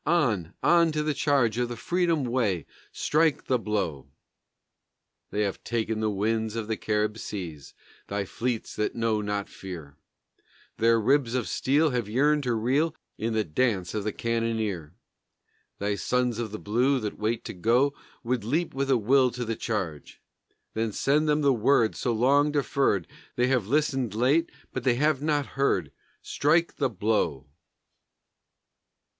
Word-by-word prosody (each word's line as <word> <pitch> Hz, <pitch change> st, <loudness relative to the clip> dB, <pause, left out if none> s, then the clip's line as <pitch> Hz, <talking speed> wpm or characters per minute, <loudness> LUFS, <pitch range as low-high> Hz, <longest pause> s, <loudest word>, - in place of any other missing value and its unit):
On, 110 Hz, -, +1 dB
on, 170 Hz, -1 st, +5 dB
to 150 Hz, 0 st, 0 dB
the 150 Hz, 0 st, 0 dB
charge 130 Hz, -7 st, +2 dB
of 120 Hz, -1 st, 0 dB
the 120 Hz, -, -4 dB
freedom 170 Hz, +1 st, +1 dB
way, 115 Hz, -, 0 dB, 0.3 s
Strike 155 Hz, 0 st, +1 dB
the 130 Hz, -2 st, +1 dB
blow! 100 Hz, -, -2 dB, 1.2 s
They 105 Hz, -, -1 dB
have 100 Hz, -2 st, -3 dB
ta'en 110 Hz, -1 st, -1 dB
the 110 Hz, 0 st, +1 dB
winds 110 Hz, +2 st, -1 dB
of 115 Hz, -2 st, -2 dB
the 110 Hz, -, -1 dB
Carib 105 Hz, +1 st, -1 dB
seas, 85 Hz, -10 st, -7 dB, 0.3 s
Thy 100 Hz, 0 st, -2 dB
fleets 120 Hz, +3 st, -3 dB
that 105 Hz, -, -1 dB
know 115 Hz, -2 st, 0 dB
not 105 Hz, -1 st, -2 dB
fear; 85 Hz, -7 st, -9 dB, 0.8 s
Their 115 Hz, 0 st, +4 dB
ribs 130 Hz, +1 st, +2 dB
of 125 Hz, -3 st, -1 dB
steel 150 Hz, +3 st, +2 dB
have 120 Hz, -4 st, -2 dB
yearned 145 Hz, +6 st, +3 dB
to 120 Hz, -2 st, +1 dB
reel 135 Hz, +8 st, +1 dB, 0.2 s
In 115 Hz, +1 st, -1 dB
the 110 Hz, -1 st, +1 dB
dance 95 Hz, 0 st, 0 dB
of 105 Hz, -, -2 dB
the 105 Hz, -, -1 dB
cannoneer. 110 Hz, -9 st, -2 dB, 0.8 s
Thy 100 Hz, +1 st, -1 dB
sons 125 Hz, +2 st, 0 dB
of 115 Hz, -2 st, -2 dB
the 110 Hz, -, -4 dB
blue 125 Hz, +7 st, +1 dB
That 105 Hz, -3 st, -5 dB
wait 110 Hz, +2 st, -1 dB
to -, -, -5 dB
go 120 Hz, +9 st, +2 dB, 0.3 s
Would 120 Hz, -2 st, -1 dB
leap 155 Hz, +10 st, -1 dB
with 135 Hz, +1 st, -2 dB
a 130 Hz, -, +5 dB
will 130 Hz, +4 st, +4 dB
to 125 Hz, 0 st, -5 dB
the 115 Hz, 0 st, -2 dB
charge, 95 Hz, -11 st, -4 dB, 0.5 s
Then 110 Hz, 0 st, -1 dB
send 150 Hz, +8 st, +1 dB
them 150 Hz, 0 st, +2 dB
the 140 Hz, -2 st, +4 dB
word 115 Hz, -1 st, +3 dB
so 125 Hz, -, -1 dB
long 140 Hz, +6 st, +3 dB
deferred; 135 Hz, -, +1 dB, 0.3 s
They 125 Hz, +1 st, +2 dB
have 125 Hz, -7 st, +1 dB
listened 135 Hz, -5 st, 0 dB
late, 140 Hz, +9 st, +2 dB, 0.2 s
but 130 Hz, -, -3 dB
they 125 Hz, -2 st, +3 dB
have 150 Hz, +1 st, +2 dB
not 150 Hz, -2 st, +1 dB
heard; 100 Hz, -, 0 dB, 0.3 s
Strike 165 Hz, +4 st, +1 dB
the 135 Hz, -3 st, +1 dB
blow! 100 Hz, -, 0 dB
115 Hz, 160 wpm, -27 LUFS, 105-140 Hz, 1.2 s, on